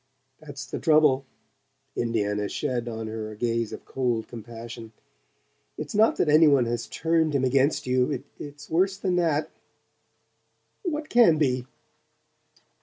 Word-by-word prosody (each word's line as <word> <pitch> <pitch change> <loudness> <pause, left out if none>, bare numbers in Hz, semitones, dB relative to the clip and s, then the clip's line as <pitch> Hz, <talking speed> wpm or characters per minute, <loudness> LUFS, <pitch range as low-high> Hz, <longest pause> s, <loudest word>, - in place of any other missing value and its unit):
"That's 145 -3 -8
the - - -5
trouble." 150 -4 +3 0.7
Indiana 105 -3 -1
shed 120 -2 -2
on 110 -1 -5
her 110 0 -5
a 110 - -9
gaze 115 -1 -1
of - - -9
cold 120 -4 -1
compassion. 115 0 -9 0.8
"It's - - -6
not 215 +2 +4
that - - +1
any 155 +2 +6
one 140 -4 +4
has 120 0 -3
turned 160 -2 0
him 135 - +1
against 135 +3 +2
you. 130 +1 0 0.2
It's 145 0 -9
worse 190 +4 +1
than 190 -3 -1
that 160 -3 +1 0.7
" - - -46
"What 300 0 -4
can 230 -10 +5
be?" 130 -4 0
130 Hz, 140 wpm, -26 LUFS, 115-155 Hz, 0.8 s, any